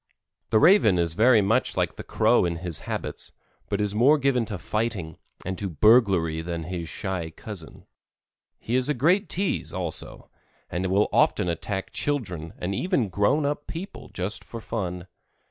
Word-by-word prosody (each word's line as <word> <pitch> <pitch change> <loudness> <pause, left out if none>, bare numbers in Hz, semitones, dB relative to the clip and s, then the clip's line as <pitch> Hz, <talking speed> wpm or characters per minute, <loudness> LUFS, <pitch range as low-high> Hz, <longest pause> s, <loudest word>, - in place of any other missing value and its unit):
The - - +4
Raven 160 - +6
is 85 -2 0
very 115 +4 +5
much 100 - +1
like - - 0
the - - -8
Crow - - +3
in 85 -1 0
his 85 -1 -3
habits, - - -5 0.4
but 100 - -1
is 105 -1 0
more 130 +8 +5
given 135 -4 +1
to 105 -3 -5
fighting 100 -4 -3 0.3
and 95 +1 -3
to 100 - -3
burglary 90 - +4
than 85 0 -4
his 85 -1 -5
shy 95 -5 -4
cousin. 95 0 -9 0.7
He 120 - -3
is 130 +2 +2
a 150 - +1
great 175 - +2
tease, 195 +1 -1
also, 90 -4 -6 0.4
and 90 +2 -1
will 100 +3 +3
often - - +3
attack 95 +3 -3
children 90 - -2
and 90 +2 -3
even 135 - 0
grown 105 +11 +2
up 145 +1 -2
people 185 +5 -7
just 95 +5 -3
for 115 - -8
fun. 90 -6 -4
100 Hz, 165 wpm, -25 LUFS, 90-125 Hz, 0.7 s, Raven